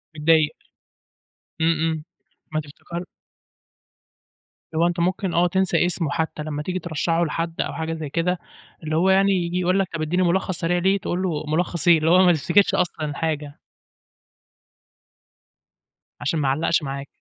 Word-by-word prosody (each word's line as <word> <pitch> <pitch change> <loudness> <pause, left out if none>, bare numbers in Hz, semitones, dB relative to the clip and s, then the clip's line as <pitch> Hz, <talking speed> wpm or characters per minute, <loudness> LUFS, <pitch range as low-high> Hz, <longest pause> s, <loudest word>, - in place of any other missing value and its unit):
متضايق. 155 0 +3 1.1
إمم، 160 +1 +3
إمم 160 -1 -1 0.5
ما 155 - 0
تفتكر 170 +4 -8 1.7
اللي 160 - +2
هو 170 - +4
أنت 175 0 -2
ممكن 185 +1 0
آه، 175 +1 +3
تنسى 190 0 +2
اسمه 170 -3 -1
حتى، 160 -1 -2
لمّا 150 -1 -4
تيجي 185 +3 -2
ترشّحه 165 +1 0
لحد 165 +1 -2
أو - - -3
حاجة 160 0 -3
زي 155 -3 -5
كده، 170 +3 0 0.4
اللي 155 0 -2
هو 185 +3 +3
يعني 195 +1 +4
ييجي 180 -1 0
يقول 185 +2 +2
لك 190 - +1
طَب 165 - -3
إدّيني 180 +4 +1
ملخص 180 0 0
سريع 175 +1 +1
ليه، 190 +3 +2
تقول 185 -1 -3
له 160 -5 -1
ملّخص 170 0 -1
إيه؟ 170 - +8
اللي 160 +1 +1
هو 185 +2 +6
ما 175 - +6
تفتكرش 195 +6 +3
أصلًا 155 -4 -1
حاجة. 150 -3 -3 2.6
عشان 150 +2 0
ما 140 -2 +1
علّقش 155 +4 +1
معاك. 140 0 -5
165 Hz, 160 wpm, -23 LUFS, 155-180 Hz, 2.6 s, إيه